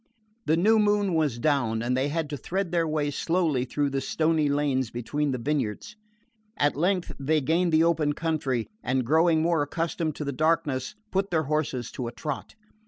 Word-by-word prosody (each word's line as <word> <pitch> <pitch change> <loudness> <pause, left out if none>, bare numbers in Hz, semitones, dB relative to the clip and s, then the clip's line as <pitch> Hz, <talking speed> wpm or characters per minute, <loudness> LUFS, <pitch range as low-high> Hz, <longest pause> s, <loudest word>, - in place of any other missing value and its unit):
The 160 - +3
new 215 +6 +4
moon 205 -2 +2
was 150 -7 +1
down 120 -5 +1
and 125 +1 0
they 130 +2 +1
had 160 +1 -2
to - - -2
thread 185 +5 -3
their 170 -2 +1
way 150 -2 0
slowly 160 -4 0
through 145 +2 -1
the 135 0 -1
stony 155 +1 +1
lanes 140 -4 0
between 140 +6 -2
the 130 - -1
vineyards. 140 - -2 0.6
At 145 0 +2
length 180 +4 0
they 155 +3 +2
gained 165 +5 +1
the 160 0 +4
open 160 -3 +2
country, 145 -7 -1 0.2
and 130 0 0
growing 160 +3 +3
more 165 -2 +2
accustomed 160 +1 -2
to 150 - -5
the 140 - -1
darkness 150 +1 0 0.2
put 195 +1 0
their 160 -2 +1
horses 140 -5 -2
to 125 - -4
a - - -4
trot. 140 - -6
150 Hz, 185 wpm, -26 LUFS, 135-165 Hz, 0.6 s, new